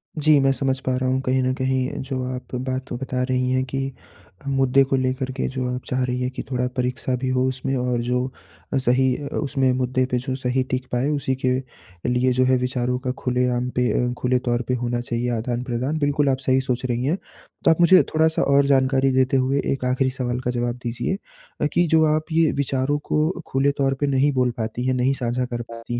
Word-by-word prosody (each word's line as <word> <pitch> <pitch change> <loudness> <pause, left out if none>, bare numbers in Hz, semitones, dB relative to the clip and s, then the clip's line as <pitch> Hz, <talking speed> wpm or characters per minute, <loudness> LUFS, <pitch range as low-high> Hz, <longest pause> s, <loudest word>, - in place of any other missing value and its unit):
जी, 155 -1 +4
मैं 135 0 +3
समझ 135 -1 -1
पा 130 - +1
रहा 130 0 0
हूँ, 130 +1 +1
कहीं 130 0 +1
न 130 0 +1
कहीं 130 0 0
जो 130 -1 -3
आप 125 0 -8
बात 130 +1 -3
बता 130 +1 -3
रही 130 0 0
हैं 130 0 +2
कि 135 +1 -3 0.5
अ, - - -8
मुद्दे 135 0 +3
को 135 0 0
लेकर 130 0 -1
के - - 0
जो 130 -1 -3
आप 125 - -4
चाह 130 0 0
रही 125 0 -2
हैं 125 - 0
कि - - -6
थोड़ा 125 0 0
परीक्षा 125 +1 -1
भी 130 - -1
हो 130 0 +2
उसमें 130 +1 -2
और 125 -1 0
जो 125 +1 0 0.5
अ, - - +2
सही 130 0 +2
अ, 145 - -6
उसमें 135 -3 +1
मुद्दे 130 0 0
पे 125 - +2
जो 130 +1 -3
सही 130 0 0
टिक 130 0 -1
पाए 125 +3 +1
उसी 140 -3 0
के 125 - +3 0.6
लिए 125 +1 +2
जो 130 +1 +3
है 130 0 +4
विचारों 125 0 -1
का 125 0 -2
खुलेआम 125 0 0
पे 125 0 +2 0.2
अ, - - -3
खुले 125 0 +1
तौर 120 -1 0
पे 125 - 0
होना 120 0 -1
चाहिए 120 0 -2
आदान-प्रदान। 125 +4 -2
बिल्कुल 145 -1 +2
आप 130 - +2
सही 130 0 +3
सोच 130 -1 -2
रही 120 0 -1
हैं। 160 +7 +1 0.5
तो 165 - +7
आप 160 - +2
मुझे 180 +2 +7
थोड़ा-सा 160 0 +3
और 140 0 +4
जानकारी 135 -1 +3
देते 130 +1 +3
हुए 135 +2 +1
एक 130 -2 -4
आखिरी 130 +1 +1
सवाल 125 -1 -3
का 125 -1 -2
जवाब 120 0 -1
दीजिए, 120 +10 -2 0.4
अ, - - +3
कि 175 0 +3
जो 160 0 +4
आप 155 +2 -4
ये 160 -1 +3
विचारों 135 +1 0
को 155 +1 +2 0.2
खुले 135 +2 +2
तौर 135 -1 +2
पे 145 - +1
नहीं 140 +1 +3
बोल 125 -1 +2
पाती 120 +2 -3
हैं, 130 - +2
नहीं 130 +2 +2
साझा 125 -1 -1
कर 120 -1 -4
पाती 115 +1 -6
130 Hz, 225 wpm, -23 LUFS, 125-135 Hz, 0.6 s, तो